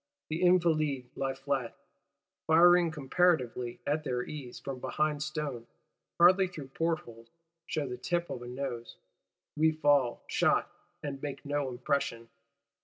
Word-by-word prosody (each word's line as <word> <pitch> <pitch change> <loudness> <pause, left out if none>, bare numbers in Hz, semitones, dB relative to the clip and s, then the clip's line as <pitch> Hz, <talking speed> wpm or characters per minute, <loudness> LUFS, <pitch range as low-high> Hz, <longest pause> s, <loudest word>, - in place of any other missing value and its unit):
The 160 +3 -2
Invalides 155 -8 +2
lie 135 -1 -2
flat, 135 -3 -3 0.7
firing 175 +2 +6
comparatively 135 -6 0
at 150 +2 0
their 125 -4 -1
ease 135 -5 -8
from 135 -2 -6
behind 150 +2 -1
stone; 150 -6 -4 0.5
hardly 185 +2 +6
through 155 -7 -9
portholes, 135 -7 -3 0.4
shew 155 -5 -2
the 125 -1 -5
tip 175 -1 -2
of 120 - -5
a 120 - -8
nose. 125 -2 -5 0.6
We 160 +1 +4
fall, 145 -5 +2
shot; - - +2 0.3
and 140 -2 -5
make 140 -1 -6
no 145 -1 -1
impression! 120 -2 -2
145 Hz, 130 wpm, -30 LUFS, 125-160 Hz, 0.7 s, firing